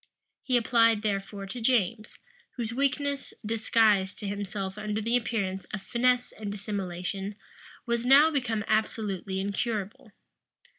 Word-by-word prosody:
He 255 Hz, -2 st, +2 dB
applied 230 Hz, -2 st, +3 dB
therefore 200 Hz, -1 st, -2 dB
to 235 Hz, +5 st, -6 dB
James, 225 Hz, -2 st, +1 dB, 0.4 s
whose 230 Hz, -2 st, -2 dB
weakness, 280 Hz, +1 st, -1 dB
disguised 215 Hz, -3 st, +2 dB
to 205 Hz, -, -5 dB
himself 195 Hz, -1 st, -4 dB
under 210 Hz, 0 st, -2 dB
the 230 Hz, +3 st, 0 dB
appearance 200 Hz, -5 st, -1 dB
of 205 Hz, -2 st, -6 dB
finesse 250 Hz, +2 st, +1 dB
and 210 Hz, -2 st, -6 dB
dissimulation, 195 Hz, 0 st, -4 dB, 0.5 s
was 235 Hz, -1 st, 0 dB
now 280 Hz, +5 st, +7 dB
become 240 Hz, -7 st, -1 dB
absolutely 210 Hz, -3 st, -1 dB
incurable. 205 Hz, +1 st, -3 dB
215 Hz, 120 wpm, -28 LUFS, 200-235 Hz, 0.5 s, now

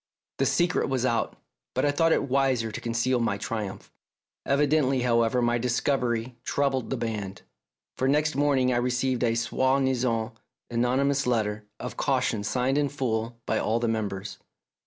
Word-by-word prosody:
The -, -, +3 dB
secret 175 Hz, -3 st, +1 dB
was 130 Hz, -2 st, 0 dB
out, 120 Hz, -2 st, 0 dB, 0.4 s
but -, -, +2 dB
I 145 Hz, -, +3 dB
thought 165 Hz, +3 st, +2 dB
it -, -, +3 dB
wiser 130 Hz, -4 st, +1 dB
to 120 Hz, -, -6 dB
conceal 120 Hz, +2 st, 0 dB
my 110 Hz, -4 st, 0 dB
triumph. 105 Hz, -3 st, -5 dB, 0.5 s
Evidently, 140 Hz, -2 st, +2 dB
however, 115 Hz, 0 st, +2 dB
my 120 Hz, 0 st, +2 dB
discovery 125 Hz, -1 st, 0 dB
troubled 135 Hz, -3 st, 0 dB
the 135 Hz, -, -1 dB
band, 105 Hz, -4 st, -4 dB, 0.6 s
for 130 Hz, -, +2 dB
next 150 Hz, +2 st, +2 dB
morning 135 Hz, -3 st, +2 dB
I -, -, +1 dB
received 125 Hz, +1 st, 0 dB
a 115 Hz, -1 st, +2 dB
soi 130 Hz, +3 st, +1 dB
disanl 120 Hz, -4 st, 0 dB, 0.4 s
anonymous 130 Hz, +4 st, +1 dB
letter 105 Hz, -3 st, 0 dB
of 125 Hz, -, -6 dB
caution 125 Hz, -6 st, 0 dB
signed 130 Hz, +5 st, +1 dB
in 145 Hz, -1 st, +1 dB
full 115 Hz, -4 st, -2 dB
by 110 Hz, -, 0 dB
all 115 Hz, +2 st, 0 dB
the 120 Hz, -, 0 dB
members. 105 Hz, -3 st, -3 dB
125 Hz, 155 wpm, -27 LUFS, 115-135 Hz, 0.6 s, The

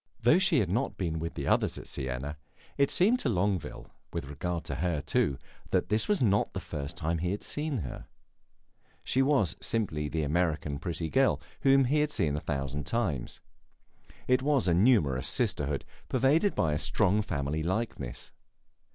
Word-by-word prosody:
Though 120 Hz, +9 st, +5 dB
she 170 Hz, -, +4 dB
had 95 Hz, -, -1 dB
not 120 Hz, +7 st, -1 dB
been 80 Hz, -4 st, -2 dB
with 85 Hz, +1 st, -4 dB
the -, -, -4 dB
others -, -, +2 dB
at -, -, -8 dB
Siena, 70 Hz, +2 st, -4 dB, 0.4 s
it 140 Hz, -1 st, +3 dB
seemed 220 Hz, +8 st, +3 dB
to 140 Hz, -, 0 dB
Longueville, 95 Hz, -4 st, -1 dB, 0.3 s
with 80 Hz, -4 st, -5 dB
regard 85 Hz, +4 st, -3 dB
to -, -, -4 dB
her, 85 Hz, -2 st, 0 dB
too, 70 Hz, -1 st, 0 dB, 0.3 s
that -, -, +1 dB
this 110 Hz, +2 st, +2 dB
was 205 Hz, -9 st, +2 dB
not 100 Hz, -3 st, +2 dB
the -, -, -3 dB
first 70 Hz, +2 st, -6 dB
time 80 Hz, +1 st, -1 dB
he 90 Hz, +2 st, -1 dB
had 100 Hz, +2 st, -3 dB
seen 150 Hz, -2 st, -1 dB
her. 65 Hz, -, -7 dB, 1.0 s
She 130 Hz, -, +1 dB
was 135 Hz, -, +2 dB
simply 80 Hz, -10 st, -1 dB
the 80 Hz, +1 st, -1 dB
American 75 Hz, -2 st, 0 dB
pretty 85 Hz, -2 st, -4 dB
girl, 135 Hz, 0 st, +3 dB, 0.2 s
whom 135 Hz, 0 st, +5 dB
he 145 Hz, +5 st, +2 dB
had 150 Hz, 0 st, +2 dB
seen 75 Hz, -, +1 dB
a -, -, -1 dB
thousand 70 Hz, -1 st, -3 dB
times. 95 Hz, -, -2 dB, 0.9 s
It 130 Hz, 0 st, +3 dB
was 140 Hz, -5 st, +2 dB
a 85 Hz, -, +4 dB
numerous 85 Hz, -, +3 dB
sisterhood, 70 Hz, -1 st, -1 dB, 0.2 s
pervaded 145 Hz, -, +3 dB
by 80 Hz, -3 st, +1 dB
a 75 Hz, -, -1 dB
strong 105 Hz, +4 st, +2 dB
family 70 Hz, -4 st, -2 dB
likeness. 90 Hz, -, -3 dB
90 Hz, 175 wpm, -29 LUFS, -, 1.0 s, Though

